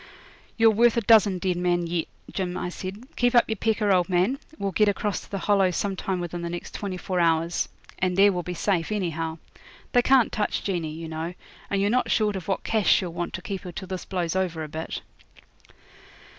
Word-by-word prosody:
'You're 225 -1 +6
worth 235 +2 +4
a - - +3
dozen 210 -3 +5
dead 180 -1 -1
men 175 -1 +1
yet, 170 -1 -1 0.3
Jim,' 180 -2 -2
I 180 - -3
said. 195 +7 -7
'Keep 245 0 +2
up 240 - +7
your 220 - -1
pecker, 215 -1 +1
old 180 -1 +3
man. 190 +10 +2 0.2
We'll 200 -1 -2
get 210 +3 +3
across 205 0 -1
to - - -16
the 200 - -3
Hollow 195 0 +3
some 195 +2 -1
time 190 0 -2
within 175 0 -4
the 170 - -3
next 175 0 -6
twenty 195 -3 -4
four 185 0 -2
hours, 165 0 +1 0.3
and 180 0 0
there 200 +1 +7
we'll 180 -2 -2
be 180 +1 -5
safe 180 -1 0
anyhow. 165 -5 -2 0.5
They 245 - +5
can't 255 -2 +4
touch 210 -1 -1
Jeanie, 175 -5 -2
you 165 +1 -6
know; 160 +2 -4 0.3
and 200 - 0
you're 200 +1 +2
not 250 +1 +1
short 210 -2 +2
of 185 -4 -6
what 195 - -1
cash 220 -4 +1
she'll 180 -4 +2
want 175 0 -4
to 185 - -7
keep 195 -2 -4
her 180 - -7
till 190 +2 -8
this 185 -1 -4
blows 180 -2 -2
over 175 -4 -1
a - - -5
bit.' 160 +2 -5
185 Hz, 220 wpm, -25 LUFS, 175-205 Hz, 0.5 s, up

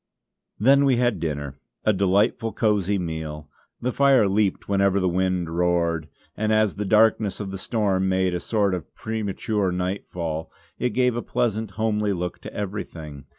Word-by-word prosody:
Then 135 +6 +5
we 135 -2 +4
had 120 -5 +1
dinner; 70 -3 -4 0.3
a 110 - +4
delightful, 100 +3 +1
cosy 105 -3 +1
meal. 80 -4 -5 0.3
The 125 - 0
fire 135 -5 +4
leaped 100 0 0
whenever 100 0 +2
the 95 - +1
wind 90 -2 0
roared; 85 -2 +1 0.3
and 110 +1 0
as 110 -1 +3
the 105 +1 -4
darkness 110 0 +3
of 100 -2 -4
the 95 - -5
storm 95 -3 0
made 95 -1 +1
a 90 - -1
sort 100 0 0
of 90 -5 -6
premature 105 -2 -2
nightfall, 90 -3 -3 0.3
it 125 0 -1
gave 125 -2 +2
a 120 - -1
pleasant, 110 -3 -1
homely 105 -2 +1
look 90 -1 -4
to - - -9
everything. 80 -8 -6
100 Hz, 160 wpm, -24 LUFS, 90-110 Hz, 0.3 s, Then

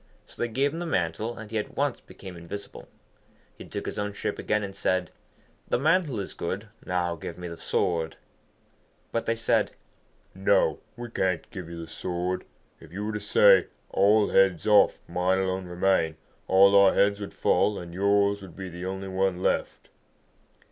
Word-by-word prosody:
So - - -10
they 120 - +1
gave 135 +5 0
him 165 - -4
the 175 - -3
mantle, 105 - -1
and 110 -1 -9
he 110 - 0
at 105 - -6
once 140 -3 0
became 95 -2 -11
invisible. 85 +4 -9 0.7
He - - -11
took - - -6
his - - -4
own 105 0 -2
shape - - -3
again, 105 0 0
and 100 -1 -6
said, 95 -2 0 0.6
'The - - +1
mantle 155 - +2
is 100 - -5
good; 100 +5 -4
now 90 -2 -1
give 80 - -7
me 90 0 -6
the 85 - -6
sword.' 80 -1 -1 1.0
But 115 - -2
they 115 - +2
said, 115 - +1 0.6
'No, 95 +1 +2 0.2
we 120 -1 -7
can't 90 -6 -1
give 90 -4 -7
you 85 0 -7
the 85 - -7
sword. 90 +2 -3 0.3
If 80 - -15
you 100 +4 -4
were 110 - -3
to 105 - -2
say, 100 -2 +5 0.2
"All 105 +2 +4
heads 95 -4 +3
off, 105 -1 +5
mine 90 +1 +1
alone 95 -1 -1
remain," 90 -3 +1 0.3
all 100 +1 +6
our 100 -1 +6
heads 100 0 +3
would 100 - -7
fall, 105 -1 +2
and 85 -1 -8
yours 100 +1 +2
would 95 -4 -11
be 95 -1 -6
the 90 +1 -7
only 95 +1 -4
one 95 -1 0
left.' - - -1
95 Hz, 180 wpm, -27 LUFS, 90-105 Hz, 1.0 s, all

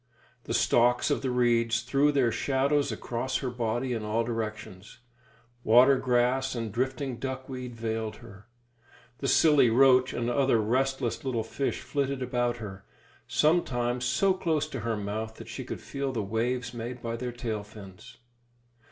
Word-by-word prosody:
The - - -3
stalks 120 +1 +3
of - - 0
the 135 - -1
reeds 115 -2 +2
threw 140 +4 +2
their 130 -5 +2
shadows 140 +4 +1
across 125 +2 -3
her 130 - -3
body 120 +1 -2
in 115 - -2
all 110 +2 0
directions; 110 -4 -5 0.7
water 125 +5 +6
grass 130 +1 +1
and 115 -2 -3
drifting 130 +2 -2
duck 130 0 -5
weed 125 -2 -6
veiled 110 -1 -3
her; 105 -3 -14 0.7
the 135 - -2
silly 145 -4 +5
roach 130 +1 +5
and 120 - -2
other 125 -1 +2
restless 130 +2 0
little 125 -4 -1
fish 135 +5 -3
flitted 140 -2 -2
about 120 -1 -1
her, 100 -4 -8 0.4
sometimes 125 -7 +1
so 130 +11 +2
close 160 -5 -1
to 135 - -5
her 115 0 -2
mouth 110 +2 -4
that - - -11
she - - -6
could - - -7
feel 140 -1 -3
the 115 -5 -2
waves 120 +4 -2
made 120 +1 -6
by 115 0 -3
their 125 +1 -4
tail 115 -3 -4
fins. 100 -3 -13
120 Hz, 160 wpm, -28 LUFS, 115-130 Hz, 0.7 s, water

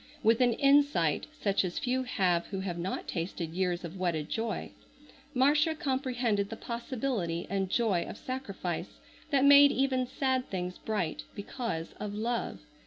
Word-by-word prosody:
With 225 +2 +4
an 245 -1 +4
insight 275 - +3
such 200 -11 0
as 180 -2 -3
few 255 +1 0
have 185 -9 +1
who 195 -2 -4
have 175 -3 -4
not 185 +3 -3
tasted 170 -2 -3
years 180 -1 0
of 175 +3 -8
wedded 165 -5 -1
joy, 225 -4 -3 0.6
Marcia 295 +5 +4
comprehended 250 -8 0
the 225 - -5
possibility 235 - -3
and 195 -1 0
joy 200 -6 +1
of - - -7
sacrifice 200 -9 -5 0.3
that 280 -2 +3
made 285 0 +9
even 260 -1 +1
sad 260 -1 0
things 180 -1 -4
bright 200 -8 -2
because 200 -6 -4
of 205 -1 -4
Love. 230 -2 -2
220 Hz, 150 wpm, -30 LUFS, 180-260 Hz, 0.6 s, made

